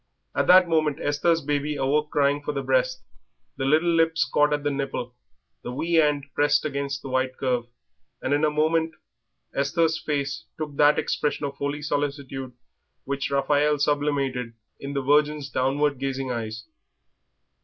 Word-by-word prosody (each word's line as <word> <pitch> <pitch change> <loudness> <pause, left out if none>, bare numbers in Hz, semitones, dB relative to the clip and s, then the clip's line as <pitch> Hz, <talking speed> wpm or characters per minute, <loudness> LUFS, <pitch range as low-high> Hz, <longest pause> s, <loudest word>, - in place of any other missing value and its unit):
At - - 0
that 185 0 +7
moment 155 -3 +1
Esther's 160 +3 +1
baby 145 +1 -1
awoke 145 +2 +1
crying 145 0 +2
for 145 - -3
the 140 - -3
breast. - - +1 0.5
The 135 - -2
little 160 +5 +3
lips 165 -3 +3
caught 150 +3 +2
at 145 -1 0
the 145 - 0
nipple, 135 -3 -3 0.5
the - - -6
wee 165 +7 -3
hand 150 -3 +3
pressed 145 0 +2
the 140 -2 -2
white 130 -1 -1
curve, 125 -3 -1 0.5
and 130 - -1
in 145 +2 +1
a 155 - +4
moment 160 +2 +1 0.6
Esther's 160 +3 +1
face 145 -3 -3
took 150 -2 -5
that 150 0 +5
expression 150 0 -1
of 140 - -4
holy 145 +1 -3
solicitude 140 -3 -3 0.5
which 140 0 -3
Raphael 145 +2 +2
sublimated 140 -4 0 0.3
in 140 0 -6
the 140 -1 -1
Virgin's 150 0 +2
downward 140 +2 +1
gazing 135 -1 -2
eyes. 110 -1 -5
145 Hz, 155 wpm, -25 LUFS, 135-150 Hz, 0.6 s, that